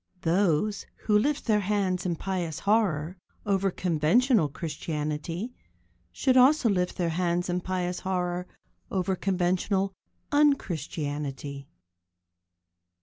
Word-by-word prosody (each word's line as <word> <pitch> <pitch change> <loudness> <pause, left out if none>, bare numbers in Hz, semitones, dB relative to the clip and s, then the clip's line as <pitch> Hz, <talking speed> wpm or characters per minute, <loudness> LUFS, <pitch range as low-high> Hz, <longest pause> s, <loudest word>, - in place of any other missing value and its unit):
Those 180 +3 +1 0.2
who 210 - +2
lift 285 +8 +2
their 215 -3 +3
hands 190 -2 0
in 170 - 0
pious 175 -3 -3
horror 190 -6 +1 0.3
over 195 -1 +2
conventional 180 - +2
Christianity 155 - -4 0.6
should 260 -2 +1
also 260 0 +6
lift 180 -3 0
their 175 -2 0
hands 175 +1 0
in 180 0 0
pious 180 -1 -2
horror 180 -1 -2 0.4
over 190 0 0
conventional 190 +1 0 0.4
un 290 -1 +5
Christianity. 145 - -5
180 Hz, 105 wpm, -27 LUFS, 165-205 Hz, 0.6 s, also